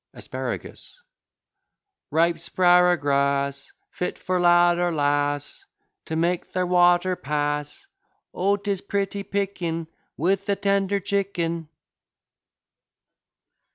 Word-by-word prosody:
ASPARAGUS -, -, -6 dB, 1.1 s
Ripe 165 Hz, +2 st, +2 dB
'sparagrass 140 Hz, -6 st, +2 dB, 0.2 s
Fit 180 Hz, -, -4 dB
for 185 Hz, -1 st, -1 dB
lad 175 Hz, 0 st, +5 dB
or 175 Hz, 0 st, +1 dB
lass, 145 Hz, -, -1 dB, 0.4 s
To 160 Hz, -, -4 dB
make 170 Hz, +2 st, -1 dB
their 185 Hz, 0 st, 0 dB
water 175 Hz, +1 st, +3 dB
pass: 145 Hz, -, -3 dB, 0.5 s
O, 200 Hz, +2 st, +1 dB
'tis 200 Hz, -2 st, -2 dB
pretty 200 Hz, 0 st, -2 dB
picking 185 Hz, -5 st, -3 dB, 0.3 s
With 195 Hz, +5 st, 0 dB
a 200 Hz, -, +3 dB
tender 200 Hz, 0 st, +1 dB
chicken! 175 Hz, -5 st, -2 dB
175 Hz, 90 wpm, -24 LUFS, 155-195 Hz, 1.1 s, lad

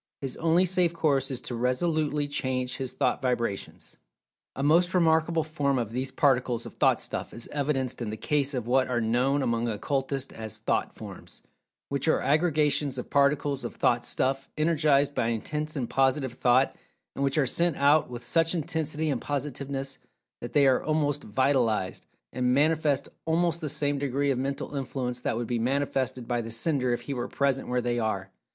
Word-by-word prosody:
His 135 Hz, -2 st, -4 dB
only 165 Hz, +3 st, +3 dB
safe 180 Hz, -2 st, +2 dB
course 145 Hz, -5 st, +1 dB
is 130 Hz, -3 st, -4 dB
to -, -, -6 dB
resolutely 145 Hz, +4 st, 0 dB
change 130 Hz, -2 st, -2 dB
his 130 Hz, -2 st, -3 dB
thought -, -, 0 dB
vibrations. 120 Hz, -6 st, -3 dB, 0.6 s
A 135 Hz, -, -3 dB
most 175 Hz, +5 st, +3 dB
remarkable 160 Hz, -1 st, +3 dB
form 145 Hz, -3 st, 0 dB
of 115 Hz, -3 st, -2 dB
these 130 Hz, +2 st, -2 dB
particles 125 Hz, -4 st, +1 dB
of -, -, -9 dB
Thought -, -, +3 dB
stuff -, -, -5 dB
is 115 Hz, -, -8 dB
evidenced 135 Hz, -4 st, -1 dB
in 115 Hz, -, -2 dB
the 110 Hz, -, -5 dB
case 140 Hz, +4 st, 0 dB
of 125 Hz, -3 st, -2 dB
what 130 Hz, +2 st, +2 dB
are 125 Hz, -2 st, 0 dB
known 125 Hz, +5 st, +1 dB
among 115 Hz, -1 st, 0 dB
occultists 135 Hz, +4 st, -2 dB
as 110 Hz, -2 st, -6 dB
"Thought -, -, -1 dB
[Pg -, -, -9 dB
227]forms," -, -, -11 dB, 0.5 s
which 140 Hz, +2 st, -1 dB
are 160 Hz, -, +4 dB
aggregations 150 Hz, -3 st, +1 dB
of 125 Hz, -, -6 dB
Particles 140 Hz, -1 st, +2 dB
of -, -, -5 dB
Thought 120 Hz, 0 st, +2 dB
stuff 135 Hz, +2 st, -1 dB
energized 150 Hz, -3 st, +3 dB
by 115 Hz, -, 0 dB
intense 150 Hz, +7 st, -3 dB
and 130 Hz, -5 st, -2 dB
positive 135 Hz, 0 st, +1 dB
thought, 125 Hz, +2 st, +3 dB, 0.4 s
and 140 Hz, -, -2 dB
which 140 Hz, +2 st, +1 dB
are 145 Hz, -, +4 dB
sent 170 Hz, +5 st, +1 dB
out 145 Hz, +2 st, +4 dB
with 120 Hz, -1 st, -8 dB
such 165 Hz, +5 st, +2 dB
intensity 160 Hz, -2 st, -1 dB
and 130 Hz, -, -2 dB
positiveness, 140 Hz, -1 st, -4 dB, 0.4 s
that 120 Hz, -, -7 dB
they 145 Hz, -1 st, +5 dB
are 130 Hz, -2 st, +3 dB
almost 150 Hz, -2 st, 0 dB
"vitalized," 115 Hz, -4 st, 0 dB, 0.3 s
and 125 Hz, 0 st, +1 dB
manifest 150 Hz, -1 st, +2 dB, 0.2 s
almost 170 Hz, +1 st, +1 dB
the 155 Hz, -, -2 dB
same 145 Hz, -1 st, -1 dB
degree 140 Hz, 0 st, 0 dB
of 130 Hz, -, -1 dB
mental 140 Hz, +2 st, -3 dB
influence 125 Hz, -2 st, -3 dB
that 115 Hz, -, -1 dB
would 120 Hz, -, -2 dB
be 120 Hz, 0 st, -1 dB
manifested 130 Hz, -1 st, -1 dB
by 120 Hz, 0 st, 0 dB
the 115 Hz, -, -7 dB
sender 125 Hz, +2 st, 0 dB
if 120 Hz, -, -1 dB
he 140 Hz, -, -5 dB
were 125 Hz, -2 st, -3 dB
present 140 Hz, -1 st, 0 dB
where 125 Hz, 0 st, 0 dB
they 120 Hz, 0 st, -1 dB
are. 100 Hz, -4 st, -2 dB
135 Hz, 185 wpm, -27 LUFS, 125-150 Hz, 0.6 s, they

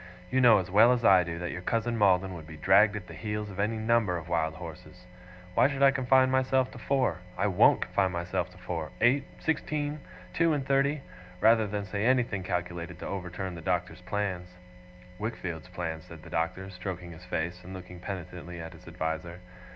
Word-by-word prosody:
You 130 Hz, -, +3 dB
know 120 Hz, -3 st, +8 dB
as 90 Hz, -1 st, -3 dB
well 110 Hz, +5 st, +7 dB
as 120 Hz, -2 st, -1 dB
I 95 Hz, -2 st, +7 dB
do 85 Hz, -1 st, -5 dB
that 85 Hz, 0 st, -4 dB
your 90 Hz, -, -5 dB
cousin 115 Hz, +4 st, 0 dB
Maldon 95 Hz, -3 st, +3 dB
would 80 Hz, -3 st, -9 dB
be 80 Hz, -1 st, -10 dB
dragged 100 Hz, +6 st, +5 dB
at 100 Hz, -3 st, -5 dB
the -, -, -11 dB
heels 105 Hz, -1 st, -4 dB
of 95 Hz, -, -9 dB
any 110 Hz, +3 st, 0 dB
number 110 Hz, -4 st, +2 dB
of 85 Hz, 0 st, -8 dB
wild 80 Hz, -2 st, 0 dB
horses 90 Hz, +1 st, -10 dB, 0.5 s
why 125 Hz, -, +5 dB
should 140 Hz, -1 st, -1 dB
I 135 Hz, -, +8 dB
confine 130 Hz, -1 st, +3 dB
myself 130 Hz, 0 st, +2 dB
to -, -, -10 dB
four! 130 Hz, -11 st, +1 dB, 0.2 s
I 95 Hz, -, +1 dB
WON'T 95 Hz, -3 st, +5 dB
confine 95 Hz, -2 st, +1 dB
myself 85 Hz, +1 st, -2 dB
to 90 Hz, -, -17 dB
four 85 Hz, -4 st, -4 dB
eight, 130 Hz, +4 st, +4 dB
sixteen, 150 Hz, -1 st, -2 dB, 0.3 s
two 165 Hz, -, +3 dB
and 140 Hz, -3 st, -1 dB
thirty, 140 Hz, +1 st, +1 dB, 0.4 s
rather 110 Hz, +1 st, +5 dB
than 100 Hz, 0 st, -3 dB
say 100 Hz, +1 st, -3 dB
anything 120 Hz, -5 st, +2 dB
calculated 90 Hz, -2 st, -4 dB
to -, -, -6 dB
overturn 95 Hz, 0 st, -4 dB
the 85 Hz, -, -8 dB
Doctor's 90 Hz, 0 st, -2 dB
plans.' 90 Hz, -2 st, -3 dB, 0.6 s
'Wickfield's 95 Hz, -7 st, -4 dB
plans,' 85 Hz, -3 st, -5 dB
said 85 Hz, -2 st, -12 dB
the -, -, -12 dB
Doctor, 90 Hz, +4 st, -2 dB
stroking 90 Hz, -1 st, -6 dB
his 85 Hz, +2 st, -12 dB
face, 85 Hz, +1 st, -3 dB
and 95 Hz, +1 st, -8 dB
looking 90 Hz, -1 st, -10 dB
penitently 90 Hz, -2 st, -7 dB
at 80 Hz, 0 st, -7 dB
his -, -, -16 dB
adviser. 80 Hz, +2 st, -4 dB
95 Hz, 195 wpm, -29 LUFS, 90-115 Hz, 0.6 s, know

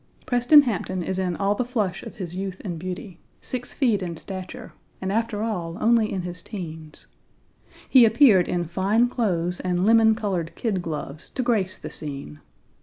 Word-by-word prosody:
Preston 245 Hz, +4 st, +6 dB
Hampton 190 Hz, -6 st, -2 dB
is 190 Hz, +2 st, -2 dB
in 180 Hz, -2 st, -1 dB
all 200 Hz, +2 st, +1 dB
the 230 Hz, -, -1 dB
flush 215 Hz, -7 st, -2 dB
of -, -, -9 dB
his 180 Hz, -3 st, -6 dB
youth 190 Hz, -1 st, -4 dB
and 175 Hz, -4 st, -4 dB
beauty, 180 Hz, 0 st, -6 dB, 0.2 s
six 250 Hz, -1 st, -4 dB
feet 230 Hz, -8 st, +1 dB
in 170 Hz, -3 st, -4 dB
stature; 190 Hz, +7 st, -8 dB, 0.3 s
and 190 Hz, 0 st, -3 dB
after 220 Hz, 0 st, -1 dB
all 175 Hz, -6 st, -3 dB
only 225 Hz, -1 st, +3 dB
in 185 Hz, -2 st, -2 dB
his 175 Hz, -1 st, -6 dB
teens; 160 Hz, -7 st, -8 dB, 0.8 s
he 260 Hz, -3 st, +7 dB
appeared 220 Hz, -5 st, +5 dB
in 175 Hz, -1 st, -1 dB
fine 195 Hz, +8 st, +2 dB
clothes 180 Hz, -8 st, -1 dB
and 180 Hz, 0 st, 0 dB
lemon 225 Hz, 0 st, +5 dB
colored 190 Hz, -7 st, -3 dB
kid 205 Hz, -6 st, -1 dB
gloves 155 Hz, -2 st, -6 dB
to 255 Hz, -, 0 dB
grace 205 Hz, -6 st, 0 dB
the -, -, -8 dB
scene. 140 Hz, -, -7 dB
190 Hz, 175 wpm, -24 LUFS, 175-225 Hz, 0.8 s, he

